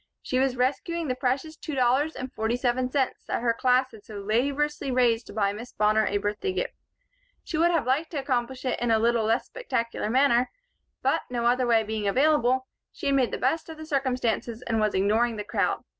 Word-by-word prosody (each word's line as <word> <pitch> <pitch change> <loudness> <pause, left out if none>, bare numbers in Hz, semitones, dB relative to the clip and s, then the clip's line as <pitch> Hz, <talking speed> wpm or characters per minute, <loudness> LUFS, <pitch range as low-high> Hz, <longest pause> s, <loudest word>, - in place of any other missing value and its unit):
She 255 - 0
was 265 -1 +1
rescuing 295 +6 -1
the 255 - 0
precious 265 +5 -1
two 310 -2 -6
dollars 265 +5 +2
and 255 0 -6
forty 220 +2 -1
seven 250 0 0
cents 265 -1 -1
that - - -2
her 235 -1 +3
class 255 +2 +2
had 215 -2 -14
so 215 - -11
laboriously 275 +8 0
raised 245 -2 +2
to - - -10
buy 200 -2 +1
Miss 235 +4 -9
Bonner 215 0 +2
a 205 - +1
birthday 205 - -2
gift. - - -2 0.7
She 310 - -3
would 340 +1 +5
have 335 -8 +1
liked 275 +6 +1
to 300 - -3
accomplish 255 -1 -2
it 255 - -1
in 240 - 0
a 225 - +4
little 230 0 +2
less 225 +3 +1
spectacular 230 - -3
manner, 255 0 +3 0.5
but, - - +2
no 240 -1 -2
other 250 +1 +3
way 225 -2 +4
being 215 -1 -3
available, 260 +1 +3 0.3
she - - -9
had 280 -1 +3
made 255 -3 +3
the - - -3
best 320 +6 0
of 315 -1 -8
circumstances 250 -4 -1
and 225 -1 0
was 215 -1 +1
ignoring 220 +5 +2
the 210 - -4
crowd. - - -1
250 Hz, 210 wpm, -26 LUFS, 225-275 Hz, 0.7 s, would